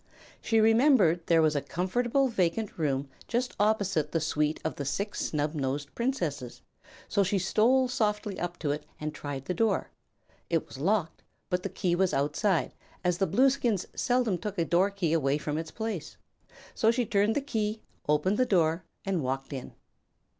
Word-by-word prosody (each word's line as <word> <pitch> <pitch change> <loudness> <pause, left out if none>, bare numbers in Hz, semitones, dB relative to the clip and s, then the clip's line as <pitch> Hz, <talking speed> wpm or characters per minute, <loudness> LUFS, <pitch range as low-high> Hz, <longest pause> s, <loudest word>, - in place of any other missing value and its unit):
She 225 - +2
remembered 220 - +4
there 165 -1 +5
was 155 -1 +2
a 145 - +1
comfortable 240 - 0
vacant 210 -1 -1
room 140 -3 0 0.2
just 245 +1 -1
opposite 200 -8 +1
the 165 - +2
suite 150 0 0
of 160 - -1
the 145 - -3
Six 200 +9 -2
Snubnosed 145 -2 -2
Princesses, 170 - -3 0.4
so 200 - +1
she 195 +2 +1
stole 230 +8 +3
softly 210 -4 -1
up 175 0 -3
to 150 -3 -1
it 150 - -3 0.2
and 150 0 -4
tried 145 -2 -6
the 180 - -1
door. 225 +5 0 0.6
It 165 -2 +1
was 130 - -10
locked, 175 +1 0 0.3
but 180 0 +1
the - - -3
key 175 -2 -1
was 185 +1 +2
outside, 160 +6 +1 0.3
as 180 -1 +1
the 195 - +2
Blueskins 240 - +2
seldom 245 -7 +1
took 205 -2 -5
a 170 - +1
door 180 +4 +3
key 190 -5 -1
away 145 -3 +2
from 150 0 -3
its 160 -1 -5
place. 220 -6 -5 0.6
So 220 - +2
she 240 +1 +2
turned 205 +1 +2
the - - +3
key, 220 -5 -2 0.3
opened 150 +7 +2
the 255 - +4
door, 165 -2 +2 0.2
and 190 -4 0
walked 135 +1 -3
in. 130 -2 -7
180 Hz, 175 wpm, -29 LUFS, 155-220 Hz, 0.6 s, there